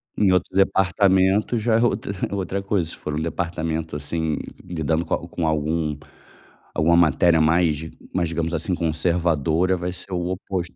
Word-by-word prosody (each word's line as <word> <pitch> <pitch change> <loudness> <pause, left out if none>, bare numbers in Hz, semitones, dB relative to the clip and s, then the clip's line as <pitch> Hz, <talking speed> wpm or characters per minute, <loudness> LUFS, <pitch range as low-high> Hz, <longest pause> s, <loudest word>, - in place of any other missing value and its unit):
Em 100 -3 +3
outro 90 0 0
departamento 95 +3 +3
já 110 +1 +1
é - - +1
outra 110 -4 0 0.2
outra 100 0 -2
coisa, 100 -4 0
se - - -6
for 75 - -5
um 80 - -2
departamento, 80 -1 -3
assim, 80 +2 -2 0.3
lidando 80 -1 -1
com - - 0
a 85 - -7
com 85 -1 -2
algum 80 0 0 0.8
alguma 85 +2 +3
matéria 85 0 +4
mais 80 -1 +3 0.3
mais 85 -2 0
digamos, 85 0 -2
assim, 85 +4 -1
conservadora, 85 +1 +1
vai 90 +1 -3
ser 90 +1 -11
o 90 0 -1
oposto. 90 -1 -4
85 Hz, 160 wpm, -23 LUFS, 80-95 Hz, 0.8 s, matéria